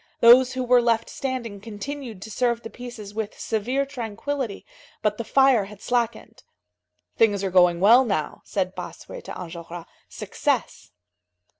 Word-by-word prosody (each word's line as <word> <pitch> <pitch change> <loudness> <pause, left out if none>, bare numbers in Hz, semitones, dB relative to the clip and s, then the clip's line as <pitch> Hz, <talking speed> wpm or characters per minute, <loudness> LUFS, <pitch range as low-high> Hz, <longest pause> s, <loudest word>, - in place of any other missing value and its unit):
Those 250 +2 +7
who 255 0 -2
were 250 0 +5
left 230 -1 +1
standing 235 -7 -4
continued 225 0 -7
to 220 - -9
serve 235 +1 0
the 225 - -8
pieces 240 -5 -9
with 215 -1 -5
severe 245 +5 -1
tranquillity, 250 -1 -4 0.4
but 210 0 0
the - - -1
fire 265 -3 +4
had 205 0 -12
slackened. 235 -2 -2 0.8
"Things 205 -3 +3
are 190 - -1
going 180 -2 +5
well 230 +7 +7
now," 195 - -2
said 185 -2 -2
Bossuet - - -9
to - - -7
Enjolras. 170 -1 -8 0.2
"Success." - - -2
225 Hz, 145 wpm, -24 LUFS, 200-250 Hz, 0.8 s, Those